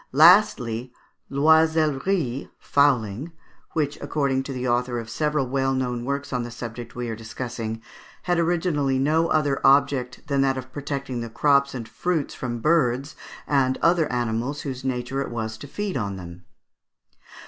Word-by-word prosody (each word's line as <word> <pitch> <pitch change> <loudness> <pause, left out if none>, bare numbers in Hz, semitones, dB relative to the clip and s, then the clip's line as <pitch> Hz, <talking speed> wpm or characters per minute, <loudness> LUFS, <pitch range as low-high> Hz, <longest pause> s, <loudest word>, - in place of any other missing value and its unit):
Lastly, 135 - +5 0.4
l'oisellerie 155 -1 +2
(fowling), 135 0 +1 0.4
which, 150 -2 -1
according 140 -3 0
to 135 - -6
the 125 -1 -3
author 120 0 0
of 115 0 -8
several 150 +2 0
well 135 +1 0
known 125 -2 -2
works 140 +1 -3
on 125 - 0
the 120 - -5
subject 120 0 -7
we 120 0 -3
are 115 - -3
discussing, 115 0 -5 0.4
had 175 -1 +1
originally 165 -5 +1
no 155 +5 +2
other 145 -4 +1
object 135 -2 +3
than 140 -3 +1
that 135 -1 +2
of 130 0 -8
protecting 140 -3 -4
the 115 - -5
crops 140 +4 +2
and 115 -3 -5
fruits 155 +7 -2
from 120 -2 -4
birds 140 -3 +1 0.3
and 130 -2 +2
other 170 -2 +3
animals 120 +3 -1
whose 130 -3 -5
nature 130 +1 -2
it - - -3
was 110 -2 -4
to 130 +6 -10
feed 205 +6 -4
on 100 -6 -2
them. 90 -1 -10
135 Hz, 155 wpm, -24 LUFS, 120-145 Hz, 0.4 s, Lastly